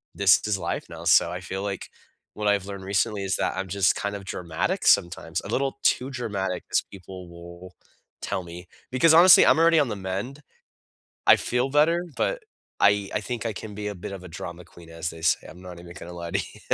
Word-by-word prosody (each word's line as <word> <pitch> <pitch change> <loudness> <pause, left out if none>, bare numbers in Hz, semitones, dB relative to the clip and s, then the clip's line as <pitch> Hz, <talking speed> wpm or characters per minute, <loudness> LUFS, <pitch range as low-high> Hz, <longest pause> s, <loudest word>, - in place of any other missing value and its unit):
"This 100 -2 +5
is 105 -2 0
life 95 - -4
now." - - -9
So 85 - +5
I 90 - -4
feel 95 +2 -5
like 100 -2 -5 0.5
what 105 0 -2
I've 100 -2 +1
learned 100 -1 -7
recently 100 +1 0
is 95 -1 0
that - - -1
I'm 95 0 -3
just 100 +1 +2
kind 100 0 -3
of 100 - -12
dramatic 85 -4 -3
sometimes. 85 -1 +2
A - - -8
little 135 0 -1
too 130 - +2
dramatic, 100 -8 -3
as - - +3
people 95 -2 -11
will 85 +1 -12 0.5
tell 95 - -3
me. 85 +1 -10 0.2
Because, 140 +6 +4
honestly, 170 +2 +8
I'm - - +5
already 165 0 +5
on 145 - +2
the 105 - -3
mend. 100 +9 -5 0.9
I - - +9
feel 125 +2 -1
better, 160 +5 +3
but - - -1 0.4
I 100 -1 +3
I - - +2
think 120 +1 -4
I 115 - -1
can 105 0 -8
be 105 0 -4
a 105 - -5
bit 90 +2 -7
of 95 - -8
a - - -9
drama 85 +1 -8
queen 85 -1 -16
as 80 +1 -4
they 80 0 -12
say. 80 -1 +1
I'm 90 - -12
not 90 -2 -10
even 85 0 -11
gonna 90 -1 -9
lie 85 -1 -6
to - - +1 0.2
you. - - -15
95 Hz, 220 wpm, -25 LUFS, 90-110 Hz, 0.9 s, I